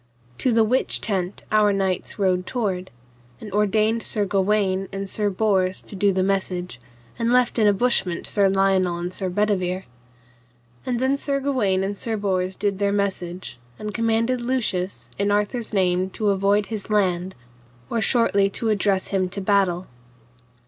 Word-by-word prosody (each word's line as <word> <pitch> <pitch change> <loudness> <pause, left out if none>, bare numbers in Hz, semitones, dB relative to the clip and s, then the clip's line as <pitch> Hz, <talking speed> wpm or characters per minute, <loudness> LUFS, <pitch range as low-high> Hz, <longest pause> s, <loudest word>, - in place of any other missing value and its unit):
To 255 - +2
the 225 -1 +4
which 250 +4 +1
tent 190 -3 -3
our 210 -1 +4
knights 195 0 -1
rode 185 -2 +1
toward, 190 -7 -2 0.5
and 210 - -9
ordained 215 +3 +2
Sir 210 -2 +2
Gawaine 195 -1 +1
and 195 0 -4
Sir 205 +1 0
Bors 190 -2 +1
to - - -11
do 200 +1 +3
the 190 0 +1
message, 180 -7 -2 0.4
and 230 0 +1
left 250 -1 +3
in 215 - +4
a - - +6
bushment 195 -5 0
Sir 200 -2 +2
Lionel 190 -2 +2
and 175 +1 -4
Sir 190 0 -3
Bedivere. 185 -1 0 1.0
And 245 -2 0
then 260 +2 +2
Sir 280 0 -1
Gawaine 225 -9 +1
and 200 +1 -2
Sir 220 +2 -3
Bors 190 -2 -1
did 200 -2 -1
their 200 0 +1
message, 185 -8 -3 0.2
and 210 0 -5
commanded 230 +2 +1
Lucius, 215 -7 -2
in 200 0 +1
Arthur's 210 +3 0
name 185 -2 +1
to 210 -2 +1
avoid 200 +1 +2
his 215 -1 -6
land, 190 -3 +1 0.5
or 230 - -1
shortly 200 -5 +3
to 225 +3 -2
address 200 -2 +1
him 185 -2 0
to 195 - -4
battle. 190 -2 +1
200 Hz, 165 wpm, -23 LUFS, 185-215 Hz, 1.0 s, a